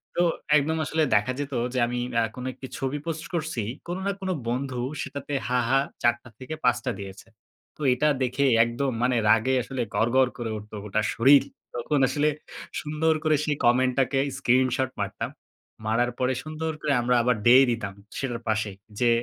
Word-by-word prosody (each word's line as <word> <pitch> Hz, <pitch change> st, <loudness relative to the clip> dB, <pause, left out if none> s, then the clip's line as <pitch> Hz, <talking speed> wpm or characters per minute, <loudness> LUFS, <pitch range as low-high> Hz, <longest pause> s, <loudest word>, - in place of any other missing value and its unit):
তো 175 Hz, -, +2 dB, 0.4 s
একদম 160 Hz, +3 st, 0 dB
আসলে 160 Hz, +1 st, +1 dB
দেখা 105 Hz, +5 st, +2 dB
যেত 145 Hz, 0 st, -4 dB, 0.2 s
যে 130 Hz, -, 0 dB
আমি 120 Hz, 0 st, -2 dB
অ্যা 115 Hz, -1 st, +3 dB
কোন 125 Hz, 0 st, -6 dB
একটি 130 Hz, +1 st, -9 dB
ছবি 135 Hz, +1 st, -2 dB
পোস্ট 160 Hz, -1 st, -4 dB
করছি। 160 Hz, -7 st, -2 dB, 0.3 s
কোন 175 Hz, +1 st, -3 dB
না -, -, +2 dB
কোন 190 Hz, -, -3 dB, 0.2 s
বন্ধু 130 Hz, +1 st, -2 dB, 0.3 s
সেটাতে 140 Hz, +1 st, -6 dB
হা, 125 Hz, 0 st, +2 dB
হা 135 Hz, +1 st, +4 dB, 0.2 s
৪ 120 Hz, 0 st, +5 dB
টা 120 Hz, -, -13 dB
থেকে 130 Hz, +5 st, -6 dB
৫ 125 Hz, -1 st, +4 dB
টা -, -, +1 dB
দিয়েছে। 95 Hz, +2 st, -9 dB, 0.5 s
তো -, -, -13 dB
এটা 150 Hz, +5 st, +1 dB
দেখে 130 Hz, +2 st, +1 dB, 0.2 s
একদম 120 Hz, +3 st, -1 dB
মানে 125 Hz, 0 st, +2 dB
রাগে 115 Hz, +4 st, +4 dB
আসলে 130 Hz, -1 st, -4 dB
গড়গড় 125 Hz, +2 st, +3 dB
করে 120 Hz, -2 st, -3 dB
উঠত 105 Hz, 0 st, -11 dB
গোটা 105 Hz, +1 st, 0 dB
শরীর। 135 Hz, +4 st, +6 dB, 0.3 s
তখন 140 Hz, +4 st, 0 dB
আসলে 145 Hz, +3 st, +1 dB, 0.5 s
সুন্দর 155 Hz, +2 st, +1 dB
করে 155 Hz, -1 st, +3 dB
সেই 150 Hz, -2 st, 0 dB
কমেন্টটাকে 130 Hz, +2 st, +3 dB, 0.2 s
স্ক্রিনশট 130 Hz, +1 st, +2 dB
মারতাম। -, -, -3 dB, 0.5 s
মারার 120 Hz, +3 st, +1 dB
পরে 130 Hz, +1 st, +1 dB
সুন্দর 155 Hz, +1 st, -3 dB
করে 150 Hz, -2 st, +1 dB
আমরা 125 Hz, +1 st, +2 dB
আবার 125 Hz, -1 st, +3 dB
ডে 120 Hz, +2 st, +8 dB, 0.2 s
দিতাম 105 Hz, -4 st, -3 dB, 0.3 s
সেটার 120 Hz, -3 st, -3 dB
পাশেই, 110 Hz, -2 st, -1 dB, 0.2 s
যে 120 Hz, -1 st, +4 dB
130 Hz, 180 wpm, -26 LUFS, 120-145 Hz, 0.5 s, ডে